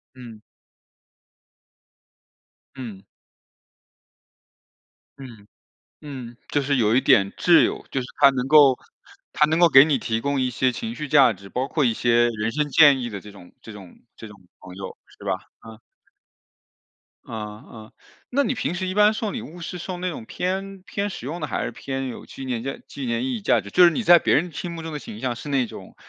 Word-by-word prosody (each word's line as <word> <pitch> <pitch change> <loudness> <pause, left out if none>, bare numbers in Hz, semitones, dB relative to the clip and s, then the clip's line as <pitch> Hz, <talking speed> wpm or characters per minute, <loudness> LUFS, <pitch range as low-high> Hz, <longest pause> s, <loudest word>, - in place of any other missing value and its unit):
嗯。 115 -4 -12 2.4
嗯。 110 -7 -8 2.2
嗯， 115 -7 -12 0.6
嗯， 130 -5 -9
就 145 - +1
是 140 +1 0
有 115 -1 +2
一 130 - +4
点 100 -2 +4
挚 170 -2 +5
友， - - -2
就 135 - -1
是 125 - -7
他 140 -1 +8
能 130 -1 -3
够 140 -3 +6 0.6
他 150 - +4
能 160 +2 0
够 175 - +7
给 135 -1 +8
你 150 -3 +1
提 115 -1 -2
供 140 +1 -1
一 130 - 0
些 125 +1 0
情 230 - -6
绪 150 - -5
价 135 -5 +5
值， 100 0 -14
包 130 +5 -2
括 150 - 0
一 115 - +2
些 120 +1 +2
人 110 0 -3
生 150 +2 -1
建 145 -3 +6
议 120 - -4
的 100 - -6
这 105 - -12
种 95 -3 -15
这 110 - -11
种 100 -4 -13 0.2
这 110 - -10
种 105 - -13 0.2
朋 90 0 -12
友， 95 0 -8 0.2
是 - - -14
吧？ 95 -2 0 0.3
嗯。 110 0 -12 1.5
嗯， 105 -1 -8
嗯， 110 -1 -12 0.4
那 280 +3 +2
你 270 - -1
平 220 -6 -3
时 185 +1 -3
一 185 - -3
般 210 +1 +5
送 215 -2 -4
礼 - - -4
物 175 +3 -11
是 175 +2 -6
送 180 +1 -6
那 185 - -2
种 160 -10 -6
偏 190 +6 -4
偏 205 +1 -3
实 130 - -8
用 165 +5 -4
的， - - -1
还 - - -3
是 - - -3
偏 135 -1 -5
有 125 - -8
纪 135 - -9
念 120 -3 -3
价 135 +1 -5
纪 140 - -7
念 115 0 -1
意 130 - -2
义 110 - -8
价 - - +3
值？ 100 - -11
就 180 - +6
是 170 - +7
你 235 - -2
在 175 -4 +7
别 - - +1
人 175 +4 +1
心 175 +3 -5
目 165 - -7
中 160 - -6
的 150 - -5
形 110 -5 -10
象 125 -2 -2
是 145 - -8
那 135 -3 +1
种， - - -12
135 Hz, 225 characters per minute, -23 LUFS, 115-160 Hz, 2.4 s, 他